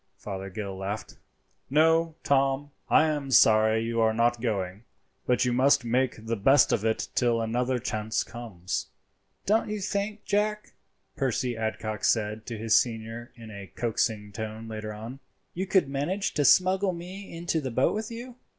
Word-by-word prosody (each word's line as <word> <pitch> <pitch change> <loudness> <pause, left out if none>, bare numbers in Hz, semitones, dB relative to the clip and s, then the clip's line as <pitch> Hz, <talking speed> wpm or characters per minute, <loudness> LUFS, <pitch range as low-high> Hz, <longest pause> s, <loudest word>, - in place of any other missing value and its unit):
Fothergill 95 0 -6
laughed. 100 +3 -5 0.5
"No, 160 +3 +3
Tom, 135 +1 +1 0.2
I - - +6
am 150 -3 -2
sorry 110 -2 +5
you 115 0 -1
are 110 0 +3
not 120 0 +2
going, 100 -3 -2 0.4
but 125 0 +3
you 125 - +1
must 130 +1 +4
make 125 -1 0
the 115 +1 -1
best 135 +6 +5
of 105 - +1
it 110 0 0
till 120 -2 +2
another 125 +3 0
chance 110 -3 -2
comes." 100 -6 -5 0.6
"Don't 215 +2 +2
you 210 0 -2
think, 205 +1 -3
Jack," 210 +1 -1 0.4
Percy 125 -2 -1
Adcock 110 -1 -3
said 110 -1 0
to 115 - -4
his 110 0 +2
senior 115 0 -1
in 115 -2 -11
a 100 -2 -8
coaxing 110 -3 -1
tone 110 +2 -6
later 110 -1 -5
on, 115 +5 -8 0.3
"you 190 +2 -3
could 190 -6 +3
manage 145 +9 -2
to 145 - +1
smuggle 185 +3 +4
me 185 +3 -8
into 170 -1 -1
the 135 - -3
boat 130 +3 +2
with 215 +1 -3
you?" 240 +1 -8
120 Hz, 160 wpm, -27 LUFS, 110-155 Hz, 0.6 s, I